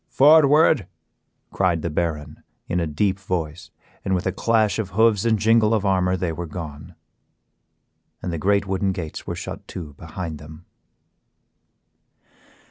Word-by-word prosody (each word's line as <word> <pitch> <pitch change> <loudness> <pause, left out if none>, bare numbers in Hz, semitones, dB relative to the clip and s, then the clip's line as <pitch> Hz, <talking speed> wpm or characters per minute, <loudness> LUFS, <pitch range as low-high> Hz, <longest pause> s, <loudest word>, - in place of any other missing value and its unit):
"Forward," 150 - +5 0.6
cried 90 -4 0
the 85 - -2
Baron, 75 -2 -3 0.3
in 90 - -1
a 85 - -1
deep 95 +6 0
voice, 85 -4 -4 0.3
and 95 - 0
with 90 - -2
a 95 - +1
clash 110 +2 +1
of 105 -4 -2
hoofs 110 -2 +3
and 115 -1 +3
jingle 110 +1 +3
of 105 -2 -1
armor 95 -1 +2
they 90 -2 -2
were 85 +1 -5
gone, 75 -2 -8 1.3
and 90 - -3
the 85 - -3
great 100 +3 +2
wooden 95 0 -1
gates 85 -5 -7
were - - -3
shut - - -7
to 80 -5 -8
behind 85 -1 -6
them. 80 +2 -13
90 Hz, 145 wpm, -22 LUFS, 80-105 Hz, 1.3 s, Forward